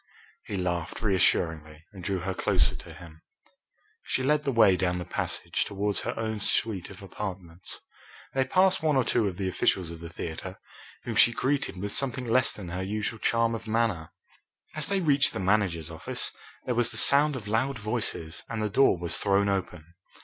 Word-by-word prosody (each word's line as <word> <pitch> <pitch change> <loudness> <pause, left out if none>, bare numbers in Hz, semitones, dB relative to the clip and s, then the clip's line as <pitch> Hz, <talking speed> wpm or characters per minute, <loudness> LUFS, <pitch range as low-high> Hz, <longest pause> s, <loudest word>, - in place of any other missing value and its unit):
He 100 - -3
laughed 90 -2 -2
reassuringly 80 -5 +1
and 95 -3 -10
drew 95 0 -2
her 95 +1 -2
closer - - +2
to 85 - -9
him. 80 -2 -13 0.8
She 130 - -2
led 150 +2 +2
the 140 - +1
way 110 -6 +5
down 90 0 0
the 90 - -5
passage - - -2
towards 100 0 -1
her - - -4
own 110 -1 -2
suite 100 -2 +1
of 100 0 -12
apartments. 95 -3 -7 0.5
They 135 0 +1
passed 185 +6 +3
one 155 -2 +2
or 130 - +3
two 110 - +1
of 90 -3 -4
the 95 - -2
officials 90 -1 0
of 85 - -9
the 85 0 -8
theatre, 85 +3 -6 0.5
whom - - -4
she 120 - +6
greeted 135 -3 -1
with 100 +2 -4
something 130 +1 0
less 125 +2 +2
than 95 -4 -8
her 90 +2 -4
usual 105 +3 -3
charm 115 +1 +1
of 115 0 -6
manner. 110 -8 0 0.6
As 155 -1 -2
they 195 -1 0
reached 145 -2 +3
the - - -4
manager's 95 -5 0
office 80 - -3 0.3
there 125 - 0
was 120 -1 +2
the - - -5
sound 145 +1 +5
of 110 -5 -7
loud 120 +5 0
voices, 105 -7 -3
and 115 - -3
the 105 - 0
door 110 -2 +4
was 85 -1 -2
thrown 100 0 +3
open. 90 -4 -4
100 Hz, 190 wpm, -27 LUFS, 90-120 Hz, 0.8 s, she